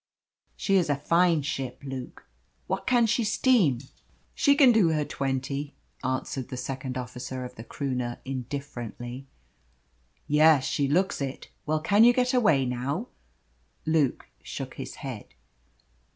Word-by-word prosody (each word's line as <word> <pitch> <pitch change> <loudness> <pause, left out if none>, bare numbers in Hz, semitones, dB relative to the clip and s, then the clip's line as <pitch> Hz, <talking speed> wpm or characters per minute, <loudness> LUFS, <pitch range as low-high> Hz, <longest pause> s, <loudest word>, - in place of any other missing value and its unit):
She 195 -1 +2
is 170 -4 +1
a 145 - +3
fine 165 +2 +2
ship, 135 -4 -4
Luke! 130 -2 -7 0.4
What - - -3
can 240 -2 +4
she 230 +2 +1
steam?" 215 - +3 0.5
"She 280 -1 +4
can 275 -4 +7
do 215 -7 +4
her 155 -2 +1
twenty," 135 +2 -3 0.3
answered 130 0 -2
the 130 - -5
second 130 0 -4
officer 125 +1 -5
of 125 - -8
the 115 - -9
Croonah, 125 -1 -3
indifferently. 130 -1 -6 1.0
"Yes, 150 -2 +5
she 140 - 0
looks 180 +3 +1
it. 135 -1 -5 0.2
Well, 155 0 +1
can 205 +7 +5
you 240 +1 +7
get 250 +1 +1
away 205 - +4
now?" 135 - -2 0.8
Luke 155 -4 +1 0.2
shook - - -6
his - - -7
head. - - -7
140 Hz, 135 wpm, -27 LUFS, 130-180 Hz, 1.0 s, can